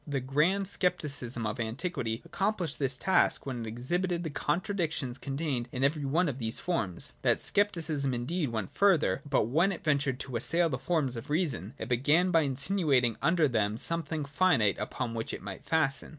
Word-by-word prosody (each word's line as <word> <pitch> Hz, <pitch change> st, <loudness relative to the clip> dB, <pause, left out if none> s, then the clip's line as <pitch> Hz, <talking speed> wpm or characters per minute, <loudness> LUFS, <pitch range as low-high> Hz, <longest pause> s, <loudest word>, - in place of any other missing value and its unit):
The 140 Hz, -2 st, -1 dB
grand 150 Hz, +10 st, +1 dB
Scepticism 140 Hz, -, -1 dB
of 105 Hz, +3 st, -3 dB
antiquity 115 Hz, 0 st, -3 dB
accomplished 190 Hz, -6 st, -1 dB
this 135 Hz, -2 st, 0 dB
task 190 Hz, -, +3 dB
when 125 Hz, -4 st, -4 dB
it -, -, -6 dB
exhibited 175 Hz, +10 st, -1 dB
the 160 Hz, -, -4 dB
contradictions 160 Hz, -5 st, -1 dB
contained 135 Hz, -4 st, -3 dB
in 130 Hz, 0 st, -2 dB
every 145 Hz, +1 st, +1 dB
one 165 Hz, +6 st, +2 dB
of 135 Hz, -2 st, -3 dB
these 115 Hz, -1 st, 0 dB
forms. 110 Hz, -, -1 dB
That -, -, +3 dB
Scepticism 165 Hz, -9 st, +1 dB
indeed 135 Hz, +6 st, -1 dB
went 110 Hz, -5 st, -4 dB
further 190 Hz, -8 st, +3 dB
• -, -, -11 dB
but 140 Hz, -, +3 dB
when 165 Hz, -, +2 dB
it 175 Hz, -, -6 dB
ventured 140 Hz, -4 st, +1 dB
to 130 Hz, -, -6 dB
assail 165 Hz, +8 st, +2 dB
the 130 Hz, -3 st, -3 dB
forms 150 Hz, -5 st, 0 dB
of 120 Hz, +5 st, -7 dB
reason, 145 Hz, -, -1 dB
it -, -, -5 dB
began 145 Hz, +9 st, +3 dB
by 165 Hz, -, +5 dB
insinuating 140 Hz, -, +1 dB
under 165 Hz, +1 st, +3 dB
them 110 Hz, -4 st, 0 dB
something 160 Hz, 0 st, 0 dB
finite 140 Hz, -, +2 dB
upon 115 Hz, +2 st, -3 dB
which 115 Hz, 0 st, -3 dB
it -, -, -10 dB
might -, -, -7 dB
fasten. 150 Hz, -4 st, 0 dB
140 Hz, 180 wpm, -30 LUFS, 125-170 Hz, -, by